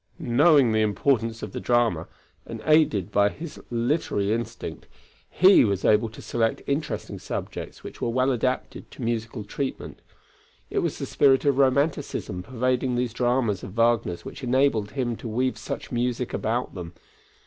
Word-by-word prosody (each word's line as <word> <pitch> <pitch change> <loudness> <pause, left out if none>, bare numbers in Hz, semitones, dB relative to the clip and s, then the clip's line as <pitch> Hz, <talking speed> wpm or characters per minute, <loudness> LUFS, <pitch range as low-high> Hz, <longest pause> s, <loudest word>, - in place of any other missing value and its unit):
Knowing 145 -2 +4
the 110 0 +2
importance 115 +1 0
of 105 - -5
the - - -5
drama, 115 -9 +1 0.4
and 115 - -6
aided 130 - +3
by 100 0 +4
his 160 +7 -9
literary 115 -4 0
instinct, 115 0 -5 0.4
he 190 +2 +6
was 100 -4 0
able 110 +1 +4
to 110 - -12
select 115 -1 -1
interesting 140 -6 -3
subjects - - -6
which - - -10
were - - 0
well 130 +3 +2
adapted 130 +1 -2
to - - -9
musical 115 -1 -2
treatment. 130 +6 -5 0.7
It - - +1
was - - -1
the - - -4
spirit 135 0 +3
of 140 -1 +2
romanticism 135 - +1
pervading 125 +3 -1
these 120 -2 -1
dramas 120 -5 +1
of 95 - -8
Wagner's 115 -7 +1
which 145 - -9
enabled 125 -4 +1
him 125 -4 -1
to - - -7
weave 125 +4 0
such - - -6
music 120 0 -1
about 120 +3 -1
them. 90 -2 -7
120 Hz, 160 wpm, -25 LUFS, 110-130 Hz, 0.7 s, he